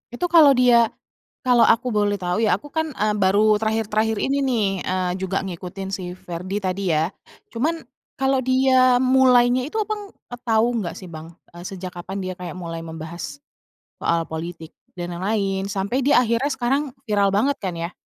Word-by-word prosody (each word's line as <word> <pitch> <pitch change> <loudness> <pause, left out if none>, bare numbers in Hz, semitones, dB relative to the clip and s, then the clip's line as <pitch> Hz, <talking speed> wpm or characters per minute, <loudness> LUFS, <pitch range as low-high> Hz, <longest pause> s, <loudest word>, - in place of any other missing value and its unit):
Itu 355 +9 -1
kalau 325 -5 +7
dia 245 -3 +4 0.5
kalau 245 -2 +5
aku 240 +2 +2
boleh 205 -2 +1
tahu 180 -1 -2
ya, 205 - +4
aku 250 +10 -7
kan, 320 -2 -2
e 210 - -1
baru 205 +2 +4
terakhir-terakhir 220 0 0
ini 275 +1 +1
nih, 240 -5 +1 0.2
eee, 185 -1 0
juga 190 +1 -2
ngikutin 190 +1 -6
si 185 -2 -5
Ferdy 185 +3 -5
tadi 185 -2 -1
ya. 160 +3 +1 0.4
Cuman, 315 +8 -1 0.3
kalau 270 0 +1
dia 255 -1 +4
mulainya 255 -1 +4
itu, 305 - -11
Abang, 415 -1 -6
e 245 - -11
tahu 230 0 +2
enggak 175 -6 -4
sih 185 -3 -10
Bang? 160 +1 -10 0.2
E 175 +1 -10
sejak 185 -1 -6
kapan 190 +3 -5
dia 185 -1 -5
kayak 180 -3 -6
mulai 170 -2 -6
membahas, 160 -2 -7 0.6
soal 170 0 +1
politik 160 0 -7 0.2
dan 175 0 -5
lain-lain 195 +1 -1
sampai 200 +6 -1
dia 275 +2 +3
akhirnya 235 +4 0
sekarang 265 +1 0 0.2
viral 205 -4 +2
banget 220 +9 +1
kan, 185 -4 -4
ya? 170 +1 -4
205 Hz, 175 wpm, -22 LUFS, 180-250 Hz, 0.6 s, kalau